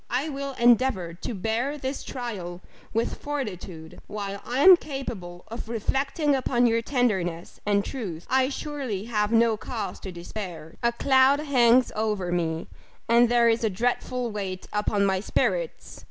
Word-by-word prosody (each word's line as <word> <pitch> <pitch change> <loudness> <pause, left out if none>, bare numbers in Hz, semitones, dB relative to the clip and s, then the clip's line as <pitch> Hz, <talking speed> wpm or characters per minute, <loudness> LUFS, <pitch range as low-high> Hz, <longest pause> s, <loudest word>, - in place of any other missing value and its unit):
I 265 +6 -1
will 275 -1 -4
endeavour 235 -8 +3
to 200 +6 -5
bear 225 +9 -1
this 265 0 -4
trial 190 -8 -5 0.3
with 225 +2 -1
fortitude 190 - -5
while 200 -1 -5
I 250 +3 -1
am 375 +1 +11
capable 230 - -7
of 230 0 -7
reflecting 275 +6 0
upon 245 -2 +2
your 230 -1 +3
tenderness 195 -10 -1
and 200 -1 +2
truth, 185 -11 -5
I 260 0 +3
surely 270 -9 -4
have 210 -2 0
no 230 -1 +4
cause 220 -1 -5
to 190 - -7
despair 175 -2 -7
a 235 - +3
cloud 265 +3 +4
hangs 255 -4 +4
over 210 -5 -1
me, 165 -2 -1 0.4
and 235 +1 +5
there 240 -1 +4
is 230 0 +2
a 220 - +3
dreadful 245 +3 -1
weight 190 -3 -5
upon 210 -1 +1
my 190 -1 +2
spirits! - - -1
230 Hz, 155 wpm, -26 LUFS, 195-260 Hz, 0.4 s, am